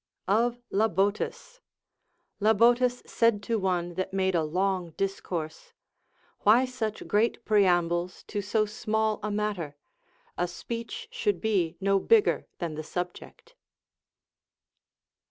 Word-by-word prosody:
Of 235 Hz, +5 st, +2 dB
Lahotus. 205 Hz, -, 0 dB, 0.8 s
Labotus 240 Hz, +4 st, +3 dB
said 230 Hz, -3 st, +2 dB
to 225 Hz, 0 st, 0 dB
one 175 Hz, -2 st, -1 dB
that 185 Hz, +2 st, -3 dB
made 190 Hz, -1 st, +1 dB
a 170 Hz, -, +2 dB
long 180 Hz, +1 st, -1 dB
discourse: 175 Hz, -5 st, -4 dB, 0.7 s
Why 230 Hz, +5 st, +5 dB
such 230 Hz, -4 st, -4 dB
great 225 Hz, +2 st, +1 dB
preambles 180 Hz, -4 st, +2 dB
to 205 Hz, -, -4 dB
so 215 Hz, +2 st, +1 dB
small 220 Hz, 0 st, -1 dB
a 210 Hz, -, -2 dB
matter? 205 Hz, -8 st, -2 dB, 0.6 s
A 175 Hz, -, +1 dB
speech 230 Hz, -, -6 dB
should 465 Hz, -4 st, 0 dB
be 185 Hz, -7 st, 0 dB
no 195 Hz, 0 st, +2 dB
bigger 435 Hz, -, +3 dB
than 170 Hz, -3 st, -3 dB
the 155 Hz, +1 st, -5 dB
subject. 180 Hz, -, -6 dB
205 Hz, 115 wpm, -28 LUFS, 180-230 Hz, 0.8 s, Why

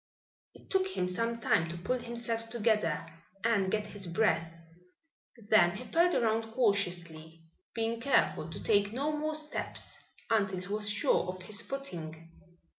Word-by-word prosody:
It -, -, -18 dB
took 380 Hz, -1 st, +3 dB
him 180 Hz, -, +1 dB
some 230 Hz, +5 st, -1 dB
time 165 Hz, -7 st, +2 dB
to 170 Hz, -, -5 dB
pull 250 Hz, +9 st, -1 dB
himself 235 Hz, -1 st, -3 dB
together 210 Hz, -9 st, +1 dB, 0.4 s
and 210 Hz, -5 st, +2 dB
get 210 Hz, -1 st, 0 dB
his 205 Hz, -3 st, -6 dB
breath. 170 Hz, -2 st, +1 dB, 0.9 s
Then 205 Hz, -5 st, +4 dB
he 250 Hz, -, -7 dB
felt 345 Hz, +4 st, +3 dB
around 225 Hz, -1 st, +1 dB
cautiously, 175 Hz, -8 st, -1 dB, 0.3 s
being 230 Hz, 0 st, -1 dB
careful 255 Hz, -, +2 dB
to 160 Hz, -, -7 dB
take 205 Hz, -2 st, +3 dB
no 290 Hz, +5 st, 0 dB
more 310 Hz, +1 st, -1 dB
steps 305 Hz, 0 st, -4 dB, 0.3 s
until 195 Hz, -4 st, +2 dB
he 180 Hz, -, -9 dB
was 210 Hz, +1 st, -1 dB
sure 210 Hz, -, +2 dB
of 185 Hz, 0 st, -5 dB
his 210 Hz, +3 st, +1 dB
footing. 165 Hz, -, -6 dB
215 Hz, 150 wpm, -31 LUFS, 180-235 Hz, 0.9 s, Then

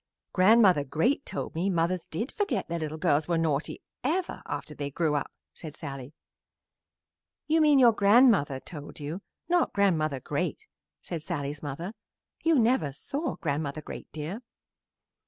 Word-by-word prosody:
"Grandmother 190 Hz, -5 st, +6 dB
Great 165 Hz, -, 0 dB
told -, -, -4 dB
me 175 Hz, +5 st, 0 dB
mothers 175 Hz, 0 st, 0 dB
did 220 Hz, -, -3 dB
forget 410 Hz, -1 st, -1 dB
their 170 Hz, 0 st, -3 dB
little 155 Hz, 0 st, -4 dB
girls 155 Hz, -3 st, +2 dB
were 170 Hz, -1 st, +1 dB
naughty 155 Hz, -2 st, -1 dB, 0.2 s
ever, 340 Hz, +7 st, -1 dB
after 145 Hz, +1 st, -5 dB
they 145 Hz, -1 st, -4 dB
grew 155 Hz, +1 st, 0 dB
up," 145 Hz, -, -1 dB, 0.2 s
said 155 Hz, -3 st, -7 dB
Sallie. 135 Hz, +1 st, -7 dB, 1.3 s
"You 320 Hz, +1 st, +3 dB
mean 300 Hz, -2 st, +6 dB
your 245 Hz, -3 st, +7 dB
grandmother 200 Hz, -, +4 dB
told 150 Hz, 0 st, -10 dB
you; 150 Hz, +6 st, -5 dB, 0.3 s
not 350 Hz, 0 st, +2 dB
Grandmother 155 Hz, -8 st, +2 dB
Great," -, -, -3 dB, 0.4 s
said 165 Hz, -, -5 dB
Sallie's 145 Hz, -1 st, -4 dB
mother. 160 Hz, +7 st, -5 dB, 0.5 s
"You 325 Hz, -2 st, +4 dB
never 230 Hz, -, +3 dB
saw 280 Hz, -, -3 dB
Grandmother 150 Hz, -2 st, -3 dB
Great, -, -, -9 dB
dear." 160 Hz, +9 st, -5 dB
165 Hz, 145 wpm, -28 LUFS, 145-225 Hz, 1.3 s, your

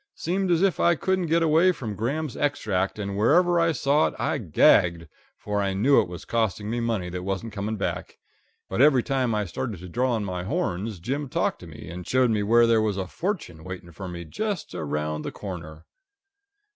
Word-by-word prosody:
Seemed 190 Hz, +3 st, -1 dB
as 170 Hz, +1 st, +3 dB
if 195 Hz, -3 st, +2 dB
I 170 Hz, -, +4 dB
couldn't 185 Hz, +1 st, 0 dB
get 165 Hz, +1 st, +2 dB
away 165 Hz, +4 st, +5 dB
from 115 Hz, -11 st, -5 dB
Graham's 140 Hz, +6 st, -2 dB
Extract, 105 Hz, -10 st, -1 dB
and 100 Hz, -1 st, -4 dB
whenever 170 Hz, -, +4 dB
I 165 Hz, 0 st, +3 dB
saw 145 Hz, +1 st, +2 dB
it -, -, -6 dB
I -, -, -1 dB
gagged, 85 Hz, -, +3 dB, 0.3 s
for 105 Hz, -1 st, -2 dB
I 100 Hz, -1 st, -1 dB
knew 130 Hz, +8 st, +5 dB
it -, -, -4 dB
was 90 Hz, -1 st, -9 dB
costing 110 Hz, -2 st, -1 dB
me 120 Hz, -, -1 dB
money 115 Hz, -6 st, -1 dB
that 90 Hz, +1 st, -5 dB
wasn't 100 Hz, +4 st, -4 dB
coming 105 Hz, +1 st, -3 dB
back; 100 Hz, -, -4 dB, 0.5 s
but 95 Hz, -, -1 dB
every 135 Hz, -4 st, +5 dB
time 130 Hz, -5 st, 0 dB
I 105 Hz, -1 st, 0 dB
started 105 Hz, +4 st, -4 dB
to 90 Hz, -, -9 dB
draw 120 Hz, +5 st, 0 dB
in 105 Hz, -, -3 dB
my 90 Hz, -2 st, -4 dB
horns 95 Hz, +1 st, -2 dB
Jim 135 Hz, -, -3 dB
talked -, -, 0 dB
to 90 Hz, -, -11 dB
me, 80 Hz, +1 st, -11 dB
and 90 Hz, +2 st, -8 dB
showed 130 Hz, -2 st, +3 dB
me 105 Hz, -2 st, +1 dB
where 115 Hz, +3 st, +5 dB
there 115 Hz, -1 st, +4 dB
was 105 Hz, -2 st, 0 dB
a 95 Hz, -, -2 dB
fortune 95 Hz, -, -4 dB
waiting 90 Hz, -1 st, -8 dB
for 95 Hz, +3 st, -8 dB
me 85 Hz, -1 st, -7 dB
just 205 Hz, -, -4 dB
around 75 Hz, 0 st, -3 dB
the -, -, -5 dB
corner. 80 Hz, -5 st, -8 dB
110 Hz, 210 wpm, -25 LUFS, 90-140 Hz, 0.5 s, away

